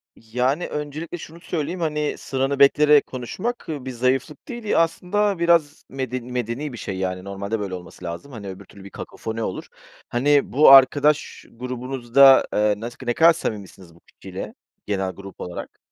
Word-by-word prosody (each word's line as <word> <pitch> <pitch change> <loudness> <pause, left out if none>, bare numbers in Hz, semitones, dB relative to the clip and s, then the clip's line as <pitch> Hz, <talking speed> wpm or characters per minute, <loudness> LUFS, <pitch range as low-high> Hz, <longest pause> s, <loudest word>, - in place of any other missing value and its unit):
Yani, 125 +8 -1
öncelikle 150 +3 -5
şunu 165 +1 -11
söyleyeyim, 170 +1 -4
hani, 150 -2 -1
sıranı 135 +1 -2
bekleyerek 150 +1 +5
konuşmak 185 - -5
bir 135 -4 -5
zayıflık 130 +4 -1
değil. 240 -2 -7
Ya, 205 - +1
aslında 180 +4 0
biraz 165 -3 +2
meden 130 -2 -4
medeni 125 +3 -4
bir - - -7
şey, 95 -3 -5
yani, 95 -1 -3
normalde 100 +2 -4
böyle 100 -2 -4
olması 90 0 -11
lazım. 85 +12 -7
Hani, 105 -4 -8
öbür 95 +1 -9
türlü 100 - -15
bir 100 - -10
kakofoni 110 +3 -6
olur. 95 - -5 0.4
Hani, 140 +4 +2
bu 150 +3 +7
arkadaş 145 +2 +5
grubunuzda, 125 +2 +3
eee, 105 0 +2
nasık 120 +4 -8
ne 120 - +2
kadar 165 +4 +6
samimisiniz 100 - -7
bu - - -20
kişiyle, - - -9 0.3
genel 95 -2 -1
grup 100 0 -11
olarak? 90 - -7
130 Hz, 160 wpm, -22 LUFS, 105-150 Hz, 0.4 s, bu